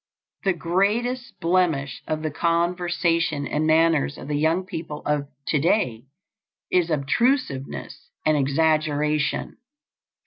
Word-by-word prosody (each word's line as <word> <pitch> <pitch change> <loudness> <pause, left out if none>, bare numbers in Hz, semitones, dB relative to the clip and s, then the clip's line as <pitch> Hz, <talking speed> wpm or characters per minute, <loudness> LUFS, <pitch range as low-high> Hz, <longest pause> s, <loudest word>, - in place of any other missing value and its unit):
The 190 - +3
greatest 205 +7 -1
blemish 165 -7 +1
of 155 0 -2
the 155 - -1
conversation 170 -2 0
and 150 +2 -1
manners 160 -3 +3
of 140 - -9
the 150 - 0
young 160 +5 +1
people 165 -5 -6
of 145 -1 0 0.2
to 150 - +2
day 135 - +1 0.7
is 175 -2 +2
obtrusiveness 155 - -1 0.2
and 155 0 +4
exaggeration. 150 +1 +1
160 Hz, 110 wpm, -24 LUFS, 150-175 Hz, 0.7 s, and